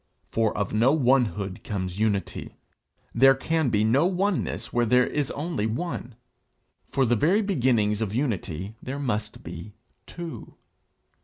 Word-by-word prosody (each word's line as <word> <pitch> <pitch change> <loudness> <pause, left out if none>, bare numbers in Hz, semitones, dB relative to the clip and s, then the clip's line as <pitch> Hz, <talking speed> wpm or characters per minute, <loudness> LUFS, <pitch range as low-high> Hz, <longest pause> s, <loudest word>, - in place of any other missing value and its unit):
For 110 -2 +1
of 100 -1 -2
no 115 +5 +4
onehood 120 -8 +1
comes 95 -2 -4
unity; 105 -3 -1 0.6
there 135 +3 +6
can 160 +1 0
be 105 -2 +2
no 130 +10 +4
oneness 195 +1 -1
where 120 -1 +2
there 125 +2 +5
is 145 -3 -1
only 145 -8 -2
one. 125 -1 -4 0.7
For 135 - +2
the 120 0 +3
very 180 - +3
beginnings 120 - +1
of 105 -3 -1
unity 105 - -2
there 130 +2 -5
must 110 -6 -3
be 100 +6 -8 0.3
two. 170 -2 -8
120 Hz, 140 wpm, -26 LUFS, 105-145 Hz, 0.7 s, there